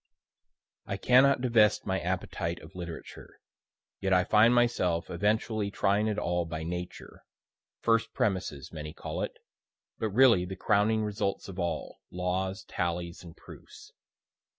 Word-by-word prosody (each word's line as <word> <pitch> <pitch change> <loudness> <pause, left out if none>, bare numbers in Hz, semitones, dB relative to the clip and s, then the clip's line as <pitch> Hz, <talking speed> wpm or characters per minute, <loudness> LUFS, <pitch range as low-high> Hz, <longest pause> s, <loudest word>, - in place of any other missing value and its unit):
I 100 - -3
cannot 130 +4 +5
divest 115 -5 +3
my - - 0
appetite 85 +1 -3
of - - -13
literature, 85 -2 -9 0.6
yet 95 -1 +1
I 90 0 +5
find 110 +4 +5
myself 120 -9 +1
eventually 105 +3 0
trying 100 +2 +1
it 105 -1 -1
all 90 -2 0
by 80 -1 -5
Nature 90 +1 -7 0.6
first 115 0 +2
premises 95 -9 -2
many 75 -1 -6
call - - -5
it, - - -4 0.6
but 110 - -1
really 115 -3 +5
the 95 +1 -5
crowning 110 +2 +2
results 105 -1 -2
of 95 -1 -8
all, 85 -1 -3
laws, 95 +2 -2
tallies 85 -1 -3
and 85 -2 -12
proofs. - - -14
95 Hz, 135 wpm, -29 LUFS, 90-110 Hz, 0.6 s, cannot